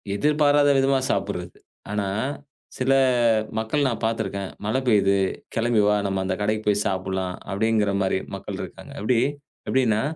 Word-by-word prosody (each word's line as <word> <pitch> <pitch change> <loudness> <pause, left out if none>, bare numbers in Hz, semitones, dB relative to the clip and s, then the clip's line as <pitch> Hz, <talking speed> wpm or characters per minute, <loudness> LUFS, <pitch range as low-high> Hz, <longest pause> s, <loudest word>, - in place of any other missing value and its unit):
எதிர்பாராத 145 +3 +3
விதமா 135 0 +3
சாப்புட்றது. - - -3 0.3
ஆனா, 105 -1 -1 0.7
சில 130 +1 +2 0.7
மக்கள் 135 +6 0
நான் 120 - -4
பாத்திருக்கேன், 100 -4 -2
மழை 110 +5 +1
பெய்து 100 -3 +4 0.4
கெளம்பி 115 -1 +2
வா 105 - +4
நம்ம 95 -1 -1
அந்த 95 0 -1
கடைக்கு 110 +1 0
போய் 105 0 +2
சாப்புட்லாம், 95 -1 -2
அப்படிங்கிற 105 0 +1
மாரி 95 0 +1 0.2
மக்கள் - - -6
இருக்காங்க. - - -9
அப்டி, 115 +2 +2 0.5
எப்டினா, 115 -5 +2
110 Hz, 135 wpm, -24 LUFS, 100-125 Hz, 0.7 s, பெய்து